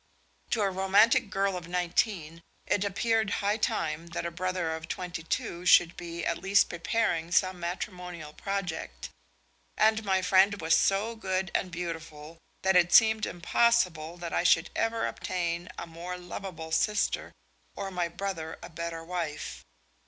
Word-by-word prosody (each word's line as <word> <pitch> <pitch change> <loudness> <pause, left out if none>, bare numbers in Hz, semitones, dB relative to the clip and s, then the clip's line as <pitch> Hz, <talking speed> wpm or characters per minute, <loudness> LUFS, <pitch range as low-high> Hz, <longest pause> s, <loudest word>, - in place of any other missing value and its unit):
To 220 - +1
a 195 - +1
romantic 200 +5 +4
girl 195 0 0
of 175 -2 -6
nineteen 175 -1 -1 0.2
it 205 - +1
appeared 220 +1 +1 0.2
high 205 +2 +2
time 165 -6 -1
that 170 0 -4
a 170 - -2
brother 180 -2 -2
of 160 0 -8
twenty 180 -1 -4
two 170 +2 -3
should 175 -2 +6
be 170 -1 -6
at 170 - -1
least 195 +1 +3
preparing 175 -2 -1
some 185 0 +2
matrimonial 175 -3 -5
project; 175 - -4 0.7
and 220 0 +3
my 190 -2 +1
friend 195 +2 +4
was 160 -1 +2
so 210 +4 +2
good 190 -3 -2
and 185 - 0
beautiful 165 -2 -6 0.2
that 190 0 +3
it 175 -1 +5
seemed 220 0 +6
impossible 175 -4 +1
that 170 -1 -6
I - - +2
should 170 -1 +4
ever 225 0 0
obtain 175 -1 -3
a - - -5
more 170 +2 -7
lovable 175 -2 -7
sister 210 +5 +1 0.4
or 195 -1 -4
my 180 -2 -1
brother 170 -3 -5
a - - -8
better 165 0 -5
wife. 165 -3 -4
180 Hz, 150 wpm, -29 LUFS, 170-195 Hz, 0.7 s, should